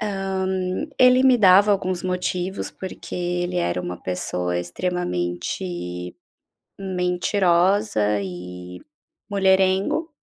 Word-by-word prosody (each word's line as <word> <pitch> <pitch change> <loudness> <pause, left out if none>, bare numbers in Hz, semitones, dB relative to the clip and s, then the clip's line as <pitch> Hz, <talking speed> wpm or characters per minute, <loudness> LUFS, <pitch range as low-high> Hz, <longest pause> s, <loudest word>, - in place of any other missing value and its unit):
Hã, 195 -2 -2 0.5
ele 250 0 +6
me 260 -1 +6
dava 200 -1 +6
alguns 185 -2 -1
motivos, 180 +1 -2
porque 190 - -8
ele 175 0 -2
era 90 - 0
uma 90 0 -5
pessoa 90 -1 -2
extremamente 90 - -3 0.6
mentirosa 180 - +1
e 90 -1 -8 0.5
mulherengo. 195 - +2
180 Hz, 90 wpm, -23 LUFS, -, 0.6 s, ele